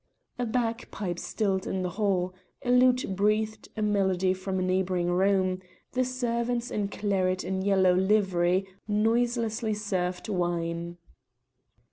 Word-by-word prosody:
A 245 - 0
bagpipe 225 -6 -2
stilled 195 -4 -1
in 190 -1 -1
the 180 - -2
hall, 185 -2 0 0.3
a 245 - +2
lute 250 -5 +4
breathed 215 +2 0
a 215 - 0
melody 190 -3 +2
from 190 0 -3
a 185 - 0
neighbouring 185 -1 +1
room, 185 0 +2 0.3
the 255 - +1
servants 245 -1 -1
in 205 -1 -1
claret 190 -3 0
and 190 0 -2
yellow 190 -2 +4
livery 190 -1 +2 0.2
noiselessly 225 +1 +1
served 185 -4 -2
wine. 170 -2 -2
195 Hz, 125 wpm, -28 LUFS, 185-220 Hz, 0.3 s, lute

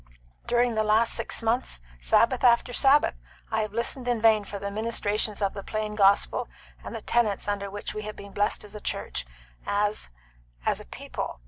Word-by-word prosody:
During 240 0 +2
the 220 0 +1
last 215 +2 +3
six - - -2
months, 225 - 0 0.2
Sabbath 230 - +3
after 245 0 +4
Sabbath, 275 +3 +4 0.4
I 220 0 +1
have 215 -1 -3
listened 235 +3 -1
in 240 -2 +1
vain 220 -1 +5
for 200 0 -6
the 200 0 -4
ministrations 210 -1 0
of 195 - +1
the 200 - -6
plain 215 +1 -3
gospel 200 -1 +3 0.4
and - - -7
the - - -6
tenets 215 -5 +1
under 200 -1 -2
which 205 +1 -5
we 215 - -4
have 215 0 -6
been 200 0 -10
blessed 205 +1 0
as 210 - -11
a 210 - -8
church - - -3 0.4
and 205 +1 0 0.6
as - - +1
a - - -10
people. - - -6
215 Hz, 190 wpm, -27 LUFS, 200-230 Hz, 0.6 s, vain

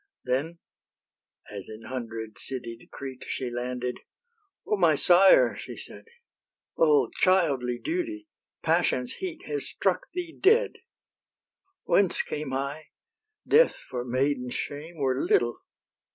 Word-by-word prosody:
Then, 140 +7 -1 0.9
as 100 -2 -8
in 110 +1 -9
hundred 115 -4 -6
citied 120 -2 -6
Crete 130 -2 -8
She 125 -2 -3
landed, 125 +1 -3 0.7
"O - - +1
my 170 -6 +4
sire!" 180 +6 +6
she - - -8
said, - - -10 0.7
"O 450 -3 +4
childly 140 -10 +3
duty! 325 -1 -3 0.4
passion's 160 -6 +1
heat 365 0 -6
Has 435 - -3
struck - - 0
thee 350 -2 -4
dead. 450 +5 +4 1.1
Whence 195 -3 +3
came 150 -2 -5
I? 140 +3 -3 0.6
death, 485 +3 +5
for 125 -1 -6
maiden's 125 0 -1
shame, 155 +4 -5
Were 135 -2 0
little. 120 0 +2
140 Hz, 115 wpm, -27 LUFS, 125-195 Hz, 1.1 s, sire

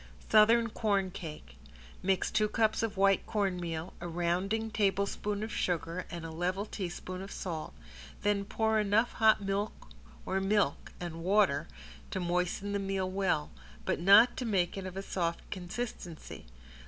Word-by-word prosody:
~SOUTHERN 230 +2 +6
CORNCAKE~ 190 -8 -2 0.4
Mix 190 0 +1
two 215 - +2
cups 220 0 +2
of 220 -3 -2
white 195 0 +4
cornmeal, 180 -5 -2
a 175 - -4
rounding 180 +6 -1
tablespoon 200 0 0
of 220 - -4
sugar 175 -1 -2
and 170 -2 -6
a 165 - -6
level 180 +5 -1
teaspoon 185 -2 -5
of 195 - -8
salt, 165 -4 -5 0.5
then 205 -1 +2
pour 220 +2 +1
enough 210 +3 +2
hot 220 -2 +4
milk 200 +2 -3 0.4
or 190 - 0
milk 195 -6 +1
and 170 -2 -5
water 180 -6 +3 0.4
to - - -3
moisten 180 +3 -1
the 200 - 0
meal 195 -1 -1
well, 185 - 0 0.3
but - - 0
not 200 +7 +7
to - - -2
make 190 -7 +1
it 195 -1 -5
of 185 0 -7
a 195 - -3
soft 170 -3 -2
consistency. 180 - -6
195 Hz, 150 wpm, -31 LUFS, 175-210 Hz, 0.5 s, not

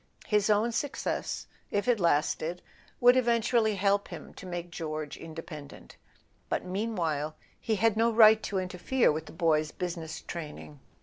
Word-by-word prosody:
His 210 -1 +2
own 215 +3 +3
success, 280 +4 -2 0.2
if 205 +3 -1
it 240 -3 +3
lasted, 170 +1 +1 0.4
would 245 +1 +7
eventually 235 -3 +2
help 200 +1 +2
him - - -9
to 190 - -10
make 175 -1 -5
George 155 -3 -4
independent; 160 -2 -10 0.5
but - - -1
meanwhile 175 -7 -2 0.2
he 220 - 0
had 225 +1 +2
no 230 +1 +3
right 220 -1 +7
to 200 - -3
interfere 185 +7 +1
with 155 0 -4
the - - -9
boy's 155 -2 +1
business 170 -2 -5
training. 150 -3 -8
185 Hz, 145 wpm, -29 LUFS, 160-220 Hz, 0.5 s, would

